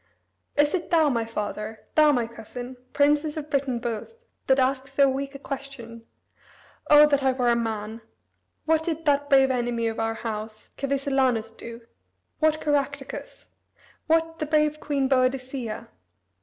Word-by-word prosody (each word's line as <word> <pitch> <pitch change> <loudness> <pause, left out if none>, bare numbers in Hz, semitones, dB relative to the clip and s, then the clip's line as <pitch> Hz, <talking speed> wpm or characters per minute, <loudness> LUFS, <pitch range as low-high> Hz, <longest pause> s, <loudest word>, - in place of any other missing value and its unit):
Is 295 0 +3
it 355 -1 -2
thou, 325 -4 +4
my 230 -4 0
father, 215 0 -5
thou, 305 -1 +6
my 245 -4 +1
cousin, 240 +2 -9 0.2
princes 295 +2 +2
of 305 -1 -6
Britain 275 -4 0
both, 235 - -5 0.3
that 265 - +4
ask 265 0 +1
so 275 +1 +3
weak 275 +1 -3
a - - -4
question? 265 -5 -8 0.8
O 295 0 +9
that 285 -2 +2
I 265 -1 +2
were 250 -1 +1
a - - +3
man! 225 -1 -3 0.6
What 320 0 +3
did 325 -1 -3
that 285 -1 +2
brave 270 -1 +5
enemy 240 -2 -1
of 225 0 -2
our 225 0 -1
house, 215 -1 -6
Cassivellaunus, 270 -5 0
do? 230 +1 -10 0.6
what 310 0 +3
Caractacus? 280 -2 -3 0.6
what 325 0 +1
the 305 - -2
brave 305 0 +2
queen 280 -3 0
Boadicea? 255 -3 -1
270 Hz, 150 wpm, -25 LUFS, 235-290 Hz, 0.8 s, O